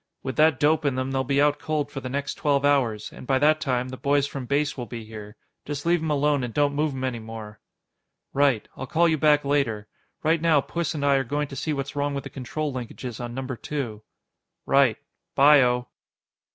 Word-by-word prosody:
"With 130 -1 -4
that 155 -3 +4
dope 155 +2 +3
in 140 -3 +1
them, 130 +1 -2
they'll 135 0 0
be 140 +2 +1
out 145 0 +3
cold 150 -2 -2
for 135 - -5
the 130 -1 -6
next 140 +2 -2
twelve 145 -1 +1
hours, 125 -7 +1
and - - -11
by 135 - +3
that 155 +3 +3
time, 125 -2 -1
the 130 - -7
boys 140 +1 +2
from 135 -3 -6
Base 145 +2 0
will 125 -3 -6
be 115 -2 -7
here. 105 -1 -10 0.3
Just 145 +1 -5
leave 170 -1 +3
'em 160 - -2
alone 145 -2 +2
and 120 - -3
don't 145 +2 +1
move 150 0 0
'em 130 - -4
any 125 -3 -2
more." 110 -1 -9 0.7
"Right. 135 -5 +2
I'll 130 - -6
call 170 +6 +3
you 160 -2 +1
back 150 -1 +4
later. 125 -7 0 0.4
Right 160 +1 +2
now, 165 -3 +4
Puss 170 +2 -3
and 145 -1 -2
I 140 -1 +4
are 135 - +1
going 145 +3 -2
to 135 - -8
see 155 +4 -2
what's 140 -1 -3
wrong 145 0 -1
with 140 - -3
the - - -9
control 145 +2 -4
linkages 125 -1 -6
on 120 0 -6
Number 130 -1 -4
Two." 120 -5 -5 0.6
"Right. 135 -5 +4 0.4
By 145 +1 +7
o." 125 0 +1
140 Hz, 225 wpm, -25 LUFS, 125-150 Hz, 0.7 s, By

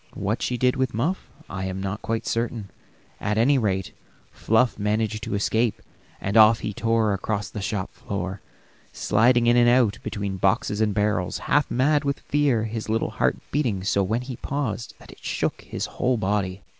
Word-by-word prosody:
What 105 +4 -2
she 125 - -1
did 125 +1 +2
with 130 -4 0
Muff 160 - -1 0.2
I 95 -1 -4
am 95 0 -4
not 100 +3 -4
quite 115 0 -2
certain; 115 -3 -2 0.5
at 105 +1 -1
any 135 +5 +4
rate 95 -4 -1 0.4
Fluff 115 +2 +1
managed 105 +1 0
to 115 -2 -3
escape, 110 +2 +1 0.4
and 100 +2 -3
off 110 0 +7
he 105 - -3
tore 115 -1 +1
across 100 +1 -3
the 105 - -5
shop 100 -1 -3
floor, 95 -1 -5 0.5
sliding 120 +3 +3
in 120 0 +5
and 120 0 +6
out 120 -5 +3
between 100 -2 -4
boxes 105 +3 +1
and 105 -2 +1
barrels, 105 -4 0
half 145 -1 +2
mad 145 +4 +2
with 140 -1 -2
fear, 140 -6 +1
his 110 0 -4
little 115 +1 0
heart - - +1
beating 120 -10 0
so 100 0 +2
when 110 +5 0
he 125 -2 -7
paused 125 -5 -3
that - - -14
it - - -17
shook - - -2
his - - -4
whole 125 -1 0
body. 95 -2 -1
110 Hz, 180 wpm, -24 LUFS, 100-120 Hz, 0.5 s, off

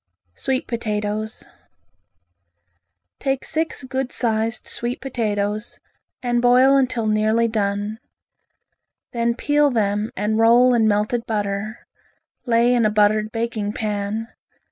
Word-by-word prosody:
Sweet 260 - -2
Potatoes 215 -2 -3 1.8
Take 270 -1 -1
six 320 -3 -1
good 265 0 -3
sized 225 -1 -1
sweet 240 +1 -4
potatoes 215 -4 -3 0.4
and 240 -1 +1
boil 250 +3 +5
until 255 -4 +1
nearly 215 +2 +2
done. 205 0 -2 1.1
Then 235 -1 0
peel 290 +3 +2
them 210 -3 0
and 210 +2 0
roll 240 +2 +5
in 225 -2 +3
melted 215 +3 0
butter, 210 0 -3 0.6
lay 235 +1 +3
in 240 -1 +2
a 215 - +3
buttered 215 +1 +2
baking 225 -2 -2
pan. 210 +1 -3
225 Hz, 110 wpm, -21 LUFS, 210-245 Hz, 1.8 s, boil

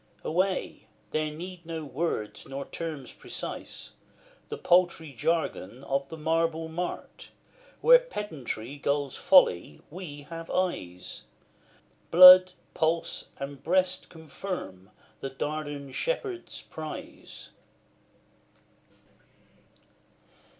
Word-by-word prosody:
Away! 185 +3 -1 0.2
there 155 0 0
need 175 +3 -8
no 165 -2 -5
words, 140 -7 -3
nor 135 +1 -5
terms 155 -6 -6
precise, - - -7 0.6
The - - -4
paltry 175 -4 +2
jargon 130 - -1
of 140 0 -1
the 160 - -7
marble 165 +1 0
mart, 175 +2 -5 0.5
Where - - +8
Pedantry 145 - -6
gulls 140 -1 -1
Folly 90 - +4
we 155 -5 -8
have 165 +2 -8
eyes: 90 - -3 0.8
Blood, 185 +1 +10 0.2
pulse, 165 0 -1
and 140 0 -7
breast, 185 +1 +1
confirm 155 - -7 0.3
the 135 - -4
Dardan 145 0 -4
Shepherd's 400 - -3
prize. - - -8
160 Hz, 90 wpm, -28 LUFS, 140-180 Hz, 0.8 s, Blood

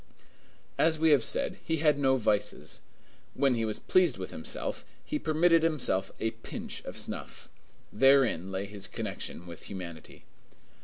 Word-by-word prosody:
As 160 -1 +4
we 160 0 +4
have 140 -5 +5
said, - - 0
he 160 - 0
had 150 -2 +3
no 135 -1 +4
vices. 105 -4 -1 0.5
When 135 -1 +3
he 115 -2 0
was 110 -1 -2
pleased 185 -1 +3
with - - -6
himself, - - -4 0.2
he 300 - -2
permitted 165 - +4
himself 155 -12 +1
a 110 - 0
pinch 115 0 -7
of - - -7
snuff. - - -4 0.4
Therein 135 -10 +4
lay 95 +1 -2
his 100 -1 -5
connection 90 - -5
with 85 -2 -10
humanity. 85 -5 -8
130 Hz, 150 wpm, -30 LUFS, 100-155 Hz, 0.5 s, have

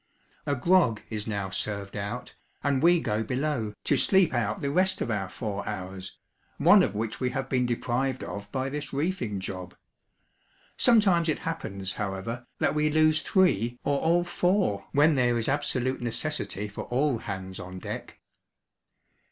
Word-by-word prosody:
A 145 - +2
grog 155 - +3
is 110 -1 -4
now 100 -3 -2
served 100 0 -4
out, 100 0 -5 0.3
and 140 -2 +1
we 175 +1 +5
go 105 -8 -1
below, 125 -3 -2
to - - +2
sleep 190 -6 +4
out 120 -5 0
the 140 - -1
rest 185 +4 +2
of 120 - -2
our 95 -3 -2
four 100 0 -4
hours, 95 -2 -6 0.4
one 180 +7 +7
of 140 - 0
which 110 +1 -3
we 125 - 0
have 135 +1 -3
been 125 -2 +1
deprived 125 +2 -1
of 100 0 -7
by 130 0 -1
this 145 0 -5
reefing 140 - -1
job. 95 -1 -6 1.0
Sometimes 195 -8 +4
it 155 - +1
happens, 100 - -3
however, 105 +5 -4
that - - +1
we 150 0 +2
lose 155 0 +3
three, 120 - +2
or 140 -1 +1
all 170 +2 +3
four, 175 - +1
when 150 +3 +5
there 120 -3 +2
is 115 - -1
absolute 135 -3 0
necessity 120 -3 -3
for 100 - -7
all 130 0 +1
hands 95 -2 -6
on 90 +1 -7
deck. - - -7
125 Hz, 160 wpm, -27 LUFS, 105-155 Hz, 1.0 s, one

